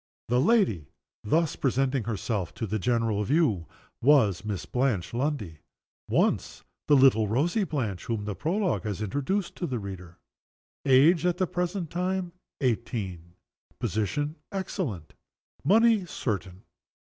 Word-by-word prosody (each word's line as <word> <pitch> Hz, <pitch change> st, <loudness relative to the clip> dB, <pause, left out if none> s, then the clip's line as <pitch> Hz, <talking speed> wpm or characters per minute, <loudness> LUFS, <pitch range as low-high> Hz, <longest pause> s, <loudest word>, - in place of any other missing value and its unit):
The 125 Hz, +1 st, +3 dB
young 130 Hz, -, +2 dB
lady 185 Hz, -, +2 dB, 0.4 s
thus 160 Hz, +8 st, +1 dB
presenting 135 Hz, -2 st, 0 dB
herself 105 Hz, -3 st, -3 dB
to 115 Hz, -, -3 dB
the 110 Hz, +1 st, -2 dB
general 115 Hz, -1 st, +1 dB
view 115 Hz, -, +1 dB, 0.3 s
was 115 Hz, -, +4 dB
Miss 105 Hz, -3 st, -4 dB
Blanche 125 Hz, -9 st, -1 dB
Lundie 120 Hz, -, -2 dB, 0.5 s
once -, -, +1 dB, 0.2 s
the 145 Hz, -, +6 dB
little 130 Hz, -5 st, +5 dB
rosy 160 Hz, -, +1 dB
Blanche 110 Hz, -, -3 dB
whom 110 Hz, -3 st, -2 dB
the 105 Hz, -, -2 dB
Prologue 175 Hz, -, 0 dB
has 105 Hz, -1 st, -3 dB
introduced 145 Hz, -, -2 dB
to 175 Hz, -, -2 dB
the 130 Hz, -, -2 dB
reader. 95 Hz, -4 st, -8 dB, 0.7 s
Age, 145 Hz, +6 st, +6 dB
at 180 Hz, -1 st, +1 dB
the 185 Hz, -, +2 dB
present 180 Hz, -1 st, -3 dB
time, 180 Hz, 0 st, -1 dB, 0.3 s
eighteen. 100 Hz, -9 st, -2 dB, 0.4 s
Position, 145 Hz, -, -2 dB
excellent. 170 Hz, -, -4 dB, 0.5 s
Money, 215 Hz, +2 st, +4 dB
certain. 100 Hz, -, -4 dB
125 Hz, 130 wpm, -27 LUFS, 105-170 Hz, 0.7 s, the